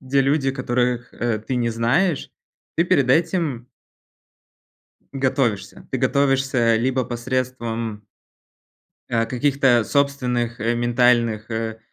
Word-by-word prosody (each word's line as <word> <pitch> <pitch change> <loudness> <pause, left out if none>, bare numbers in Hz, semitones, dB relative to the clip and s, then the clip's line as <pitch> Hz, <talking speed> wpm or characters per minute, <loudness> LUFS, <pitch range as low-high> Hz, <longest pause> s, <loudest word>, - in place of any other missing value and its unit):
где 135 +1 +1
люди, 135 0 +1
которых, 125 -2 -1
а, 115 -2 -1
ты 125 +4 -4
не 120 -1 0
знаешь, 130 +10 0 0.5
ты 170 - +3
перед 135 -7 +2
этим 160 -5 +1 1.5
Готовишься. 130 -6 -1
Ты - - -1
готовишься 135 -4 +2
либо 130 +2 0
посредством 120 -3 -3 1.1
а, 115 -1 +1
каких-то 130 0 +2
собственных 125 -4 0
ментальных, 120 -1 +1
э, 110 0 -3
125 Hz, 100 wpm, -22 LUFS, 115-135 Hz, 1.5 s, ты